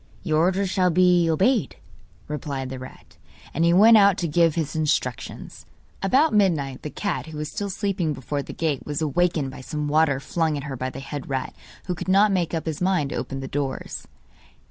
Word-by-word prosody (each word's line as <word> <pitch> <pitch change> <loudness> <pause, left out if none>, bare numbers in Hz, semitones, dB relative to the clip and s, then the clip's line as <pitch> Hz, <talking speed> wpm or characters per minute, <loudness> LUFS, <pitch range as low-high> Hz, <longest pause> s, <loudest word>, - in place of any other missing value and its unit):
'Your 155 -4 +1
orders 190 +4 +2
shall 185 -1 +2
be 180 -1 +4
obeyed,' 195 - +2 0.5
replied 140 -3 -4
the 130 - -6
rat. 130 - -13 0.3
And 165 - 0
he 170 - +4
went 220 +6 +7
out 200 -2 +5
to 170 - -1
give 165 0 +3
his 160 -2 -2
instructions. 145 -6 -3 0.3
About 265 +11 +3
midnight 160 -11 +1
the 150 - -5
cat, 200 +1 -3
who 160 -1 -8
was 150 0 -4
still 200 -1 -3
sleeping 195 -4 -1
before 145 +1 -3
the - - -8
gate, 155 -5 -2
was 150 +1 -3
awakened 155 -2 0
by 130 - -10
some 150 +2 -4
water 150 -2 +2
flung 160 +2 -1
at 140 - -5
her 140 -2 -5
by 130 +1 -3
the 130 +1 -8
head 140 0 -7
rat, 135 -1 -3 0.3
who 180 - -2
could 175 - -7
not 200 +2 +5
make 175 -5 0
up 160 - -3
his 160 -1 -4
mind 180 -6 +1
to - - -3
open 135 0 -4
the 135 - -5
doors. 135 -1 -4
160 Hz, 205 wpm, -24 LUFS, 140-185 Hz, 0.5 s, went